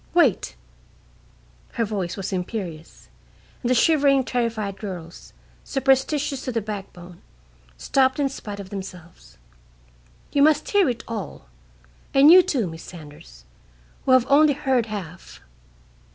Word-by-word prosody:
Wait!" -, -, +2 dB, 1.2 s
Her 230 Hz, -, 0 dB
voice 195 Hz, -4 st, -4 dB
was 195 Hz, 0 st, -4 dB
imperious; 180 Hz, -4 st, -6 dB, 0.5 s
and 245 Hz, -, -2 dB
the 255 Hz, -, +3 dB
shivering, 275 Hz, 0 st, +4 dB
terrified 225 Hz, -6 st, -2 dB
girls, 180 Hz, -5 st, -8 dB, 0.3 s
superstitious 270 Hz, +1 st, 0 dB
to 255 Hz, -, -3 dB
the 230 Hz, -, -1 dB
backbone, 195 Hz, -4 st, -8 dB, 0.6 s
stopped 260 Hz, -, +1 dB
in 285 Hz, -, +2 dB
spite 210 Hz, -6 st, -7 dB
of 195 Hz, 0 st, -9 dB
themselves. 180 Hz, -4 st, -10 dB, 0.9 s
"You 285 Hz, -, +2 dB
must 305 Hz, 0 st, +3 dB
hear 400 Hz, -7 st, +4 dB
it 235 Hz, -2 st, -4 dB
all, 215 Hz, -7 st, -6 dB, 0.7 s
and 280 Hz, +3 st, +8 dB
you, 370 Hz, +1 st, +10 dB
too, 285 Hz, -, -1 dB
Miss 165 Hz, -1 st, -8 dB
Saunders, 145 Hz, -, -13 dB, 0.6 s
who 260 Hz, -, +4 dB
have 255 Hz, -2 st, +5 dB
only 290 Hz, +1 st, +5 dB
heard 265 Hz, -5 st, 0 dB
half. 185 Hz, -6 st, -8 dB
225 Hz, 125 wpm, -23 LUFS, 185-270 Hz, 1.2 s, you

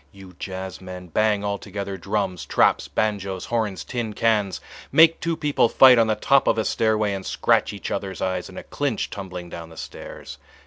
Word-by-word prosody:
you 95 Hz, -2 st, -13 dB
jazzmen, 95 Hz, -2 st, -7 dB
bang 105 Hz, -1 st, +2 dB
altogether 100 Hz, -1 st, -4 dB
drums, 95 Hz, -3 st, -2 dB
traps, -, -, +2 dB
banjoes, 100 Hz, -3 st, -2 dB
horns, 110 Hz, -5 st, -2 dB
tin 120 Hz, -4 st, -4 dB
cans—make 115 Hz, -, +2 dB
two 165 Hz, -1 st, -2 dB
people 145 Hz, -6 st, +2 dB
fight 130 Hz, -2 st, +7 dB
on 115 Hz, -, +4 dB
the 110 Hz, -, +1 dB
top 135 Hz, +5 st, +3 dB
of -, -, +3 dB
a 110 Hz, -, 0 dB
stairway 110 Hz, -2 st, +1 dB
and 95 Hz, -1 st, -4 dB
scratch -, -, +1 dB
each 100 Hz, -, -6 dB
other's 95 Hz, -2 st, -4 dB
eyes 95 Hz, -1 st, -2 dB
in -, -, -12 dB
a -, -, -6 dB
clinch -, -, -2 dB
tumbling 90 Hz, -3 st, -7 dB
down 85 Hz, -1 st, -8 dB
the 80 Hz, -, -14 dB
stairs. -, -, -9 dB
100 Hz, 175 wpm, -23 LUFS, 95-110 Hz, -, fight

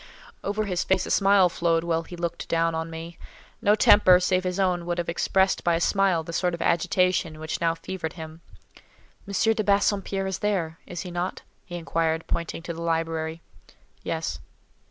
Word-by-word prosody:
Over 205 Hz, +2 st, -1 dB
his 180 Hz, -3 st, -1 dB
face 190 Hz, -1 st, +1 dB
a -, -, -5 dB
smile 195 Hz, -2 st, +5 dB
flowed, 170 Hz, -1 st, 0 dB
while 165 Hz, -1 st, 0 dB
he 170 Hz, +2 st, -10 dB
looked 170 Hz, -1 st, -4 dB
down 165 Hz, 0 st, +1 dB
on 160 Hz, 0 st, -3 dB
me: 165 Hz, +1 st, -8 dB, 0.4 s
no 205 Hz, +1 st, +4 dB
temper, 195 Hz, -4 st, +6 dB
save 185 Hz, 0 st, +1 dB
his 180 Hz, +1 st, -2 dB
own, 180 Hz, -3 st, +1 dB
would 175 Hz, -, -1 dB
have 175 Hz, -, -2 dB
expressed 190 Hz, +3 st, +1 dB
by 170 Hz, -1 st, +3 dB
a -, -, 0 dB
smile 190 Hz, -3 st, +2 dB
the 170 Hz, -, -8 dB
sort 175 Hz, 0 st, 0 dB
of 170 Hz, -, -9 dB
agitation 175 Hz, -1 st, +1 dB
which 155 Hz, 0 st, -4 dB
now 165 Hz, -1 st, +2 dB
fevered 165 Hz, -1 st, -5 dB
him. 160 Hz, 0 st, -9 dB, 0.9 s
"M. 200 Hz, +3 st, +2 dB
de 215 Hz, -, -1 dB
Bassompierre 200 Hz, -1 st, +1 dB
is 190 Hz, -2 st, -3 dB
there—is 175 Hz, -4 st, -3 dB
he 180 Hz, -, -7 dB
not?" 175 Hz, +1 st, -3 dB, 0.2 s
he 175 Hz, -, -8 dB
inquired, 165 Hz, -1 st, -1 dB
pointing 170 Hz, 0 st, -3 dB
to 170 Hz, -, -4 dB
the 165 Hz, -, -8 dB
library. 165 Hz, -1 st, -2 dB, 0.6 s
"Yes." -, -, -3 dB
175 Hz, 180 wpm, -25 LUFS, 165-190 Hz, 0.9 s, temper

